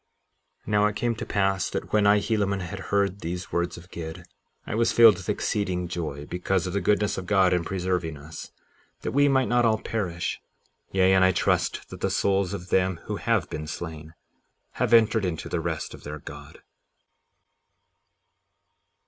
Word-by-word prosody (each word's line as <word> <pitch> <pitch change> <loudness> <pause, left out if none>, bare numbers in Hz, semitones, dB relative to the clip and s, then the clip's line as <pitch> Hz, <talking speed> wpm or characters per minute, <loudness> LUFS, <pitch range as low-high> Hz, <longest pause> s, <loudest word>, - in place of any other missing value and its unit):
57:36 - - -31
Now 105 0 +4
it 105 - -3
came 120 +2 0
to - - -5
pass 95 -2 +1
that - - -5
when 105 -1 +4
I, 100 +1 +6
Helaman, 100 -2 0
had 90 +2 -6
heard 100 -1 +1
these 90 +3 -5
words 85 0 -1
of 90 +2 -14
Gid, 80 -1 -7 0.4
I - - -5
was 115 +2 +2
filled 115 -5 +7
with 90 - -8
exceeding 90 -4 -1
joy 80 -5 -4
because 90 +2 -1
of 90 - -4
the 100 - 0
goodness 105 -1 +1
of 90 - -8
God 95 -2 +4
in 90 -1 +1
preserving 90 -3 -2
us, 75 +2 -10 0.5
that - - -3
we 145 +1 +4
might 130 -2 +3
not 120 0 +3
all 110 -2 +3
perish; 90 -6 -3 0.5
yea, 95 0 +4
and 95 -1 +5
I 95 - +5
trust - - 0
that - - -9
the - - +1
souls 95 -1 +1
of 95 -3 -6
them 95 -2 +1
who - - -4
have - - +1
been 75 0 -5
slain 80 0 -7 0.7
have - - +2
entered 110 -2 +5
into 90 -4 -3
the 85 - -2
rest 80 -1 -3
of - - -12
their 75 +1 -6
God. - - -11
95 Hz, 180 wpm, -26 LUFS, 85-105 Hz, 0.7 s, filled